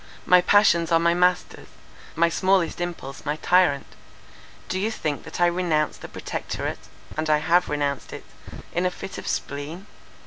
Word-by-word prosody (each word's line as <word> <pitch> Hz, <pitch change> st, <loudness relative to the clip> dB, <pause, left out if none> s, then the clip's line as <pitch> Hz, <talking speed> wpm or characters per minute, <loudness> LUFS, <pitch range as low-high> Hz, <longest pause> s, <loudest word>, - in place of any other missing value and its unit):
My 180 Hz, 0 st, +6 dB
passions 175 Hz, -3 st, +4 dB
are 165 Hz, -, +6 dB
my 170 Hz, +1 st, +3 dB
masters; 180 Hz, +1 st, 0 dB, 0.5 s
my 170 Hz, +1 st, +4 dB
smallest 185 Hz, 0 st, +1 dB
impulse 170 Hz, -6 st, -6 dB
my 150 Hz, 0 st, -1 dB
tyrant. 165 Hz, -4 st, +3 dB, 0.8 s
Do 185 Hz, -, -2 dB
you 210 Hz, +3 st, 0 dB
think 155 Hz, -9 st, -3 dB
that -, -, -7 dB
I 175 Hz, -, +5 dB
renounced 170 Hz, -3 st, 0 dB
the -, -, -7 dB
Protectorate -, -, -5 dB, 0.3 s
(and 155 Hz, 0 st, -2 dB
I 155 Hz, -, +5 dB
have 175 Hz, +4 st, +2 dB
renounced 145 Hz, -1 st, -2 dB
it) -, -, -9 dB, 0.5 s
in 180 Hz, +1 st, +1 dB
a -, -, +1 dB
fit 185 Hz, +1 st, -8 dB
of -, -, -9 dB
spleen? 145 Hz, +7 st, -4 dB
170 Hz, 165 wpm, -24 LUFS, 155-180 Hz, 0.8 s, My